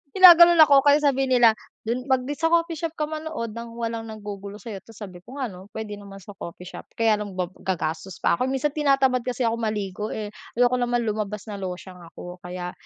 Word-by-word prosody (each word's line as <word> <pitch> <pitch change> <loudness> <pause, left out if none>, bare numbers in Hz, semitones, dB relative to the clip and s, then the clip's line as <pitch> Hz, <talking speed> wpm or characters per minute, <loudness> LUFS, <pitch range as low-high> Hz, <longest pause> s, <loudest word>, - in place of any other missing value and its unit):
Ginaganon 345 -2 +9
ako 280 -2 +6
kaya 290 +2 +4
sabi 270 -2 +2
nila 245 -3 +6 0.3
dun 245 +4 -3
mag 260 -2 +2
di 285 +3 -5
sa 325 - +2
coffee 335 -1 +1
shop 330 -1 -4
ka 305 - -2
manood 310 -6 -4
nang 230 +1 -8
walang 230 -1 -4
naggugulo 205 -2 -8
sa'yo. 210 -2 -8
Ta's 225 +4 -17
sabi 190 -4 -9
ko 240 +9 -13
ano 200 -9 -6
puwede 210 -2 -6
naman 195 -1 -12
sa 205 - -10
coffee 180 -3 -9
shop 180 - -10
kaya 225 -2 +2
lang 205 -2 -6
ga 180 -1 -3 0.2
gagastos 170 0 -3
pa - - +2
ako 255 - +1
minsan 270 +2 0
tinatamad 275 -3 +2
kasi 250 0 -1
ako 230 0 0
maligo 210 -2 -3
eh, 210 -1 -5 0.2
ayoko 245 +1 +3
naman 240 0 0
lumabas 210 -2 -3
na 200 - -6
losyang 185 -1 -7
ako. 175 +1 -11
Kaya 180 0 -6
225 Hz, 210 wpm, -24 LUFS, 200-265 Hz, 0.3 s, Ginaganon